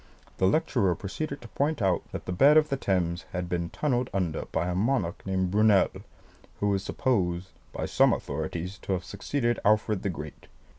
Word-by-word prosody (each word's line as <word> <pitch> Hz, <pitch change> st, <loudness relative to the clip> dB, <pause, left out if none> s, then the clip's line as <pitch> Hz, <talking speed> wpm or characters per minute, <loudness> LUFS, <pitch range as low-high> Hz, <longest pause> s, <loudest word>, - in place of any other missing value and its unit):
The 95 Hz, -, +4 dB
lecturer 95 Hz, -, +2 dB
proceeded 140 Hz, -, -5 dB
to -, -, -9 dB
point 145 Hz, +5 st, 0 dB
out 95 Hz, -5 st, +2 dB
that -, -, -6 dB
the -, -, -4 dB
bed 140 Hz, +12 st, +6 dB
of 155 Hz, -1 st, +4 dB
the 140 Hz, -, +1 dB
Thames 90 Hz, -8 st, -1 dB
had 90 Hz, -1 st, -2 dB
been 85 Hz, -1 st, -2 dB
tunnelled 125 Hz, -1 st, 0 dB
under 90 Hz, -5 st, -1 dB
by 80 Hz, +2 st, -2 dB
a 90 Hz, -, -1 dB
monarch 100 Hz, -2 st, 0 dB
named 95 Hz, -1 st, 0 dB
Brunel, 105 Hz, -1 st, +4 dB, 0.7 s
who 100 Hz, 0 st, +2 dB
is 95 Hz, -, 0 dB
supposed 95 Hz, -5 st, 0 dB, 0.2 s
by -, -, -3 dB
some -, -, +4 dB
authorities 90 Hz, +4 st, -3 dB
to 95 Hz, -, -2 dB
have 90 Hz, -1 st, -2 dB
succeeded 120 Hz, +4 st, -1 dB
Alfred 105 Hz, -1 st, +2 dB
the 100 Hz, -, -1 dB
Great. 75 Hz, -4 st, -8 dB
95 Hz, 185 wpm, -28 LUFS, 90-120 Hz, 0.7 s, bed